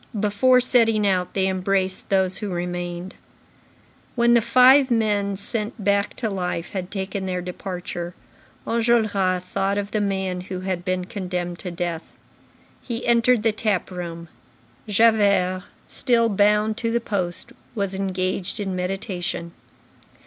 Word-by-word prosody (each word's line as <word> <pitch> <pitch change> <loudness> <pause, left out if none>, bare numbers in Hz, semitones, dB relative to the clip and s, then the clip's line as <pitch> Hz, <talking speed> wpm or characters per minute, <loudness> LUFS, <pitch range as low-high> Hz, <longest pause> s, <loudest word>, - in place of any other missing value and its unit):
Before 215 +5 +4
setting 225 -4 +3
out, 185 -2 0
they 190 -1 +2
embraced 190 0 -1
those 190 -1 +2
who 210 - -4
remained. 175 +1 -4 1.0
When 235 -1 +4
the 235 - +5
five 255 +4 +6
men 205 -4 +1
sent 215 +1 -4
back 200 +1 +1
to 230 - -2
life 180 -4 -3
had 185 -2 -4
taken 190 -1 -4
their 180 -1 -1
departure, 180 -1 -6 0.5
Enjolras 215 -6 +1
thought 195 +2 -1
of 200 0 -3
the 215 - 0
man 190 -2 -1
who 185 0 -6
had 185 -2 -3
been 185 -1 -1
condemned 180 -4 -4
to 185 - -5
death. 170 -2 -4 0.7
He 235 -1 -5
entered 235 -1 +3
the 225 - +3
tap 210 -4 -1
room. 170 -2 -6 0.6
Javert, 200 -4 +3 0.2
still 235 -3 +2
bound 210 +1 +2
to 230 -2 -1
the 235 +1 +1
post, 185 -6 -3 0.2
was 200 -3 -1
engaged 190 +1 -2
in 195 -2 -2
meditation. 180 -2 -3
195 Hz, 135 wpm, -23 LUFS, 180-215 Hz, 1.0 s, five